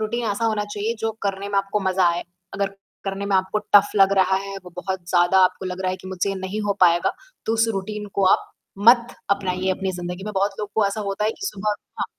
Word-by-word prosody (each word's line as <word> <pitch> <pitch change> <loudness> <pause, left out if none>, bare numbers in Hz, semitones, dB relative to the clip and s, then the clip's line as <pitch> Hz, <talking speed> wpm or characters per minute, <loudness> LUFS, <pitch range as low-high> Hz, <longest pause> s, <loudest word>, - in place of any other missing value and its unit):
Routine 235 +3 -2
ऐसा 205 +3 -2
होना 215 -2 +1
चाहिए 215 +3 -1
जो 225 0 -1
करने 200 0 -2
में 200 -1 +1
आपको 195 +1 -1
मज़ा 190 -1 +2
आए। 175 - -3 0.3
अगर 195 -1 -2 0.3
करने 195 0 -3
में 200 - 0
आपको 190 +3 0 0.2
टफ़ 205 0 +7
लग 195 -1 +6
रहा 190 0 +4
है, 195 0 -5
वो 180 - -10
बहुत 190 0 -3
ज़्यादा 175 +2 +4
आपको 185 +1 -1
लग 180 0 -5
रहा 185 - +1
है 185 - -3
कि 185 - -11
मुझसे 190 +1 -1
ये 195 - -1
नहीं 190 +3 -4
हो 200 - +2
पाएगा। 175 -1 +4 0.3
तो 225 - +1
उस 225 0 +2
रूटीन 210 +2 -4
को 200 - +2
आप - - 0 0.4
मत 240 0 +5 0.2
अपनाइए 190 -1 0
अपनी 190 0 -1
ज़िंदगी 175 +2 -5
में। 210 - -4
बहुत 200 +1 +1
लोगों 210 -1 -4
को 205 - +4
ऐसा 200 +2 -2
होता 195 +2 -2
है 215 - +2
कि 400 - -2
सुबह 210 - -1 0.3
हाँ। - - +2
195 Hz, 245 wpm, -23 LUFS, 190-210 Hz, 0.4 s, टफ़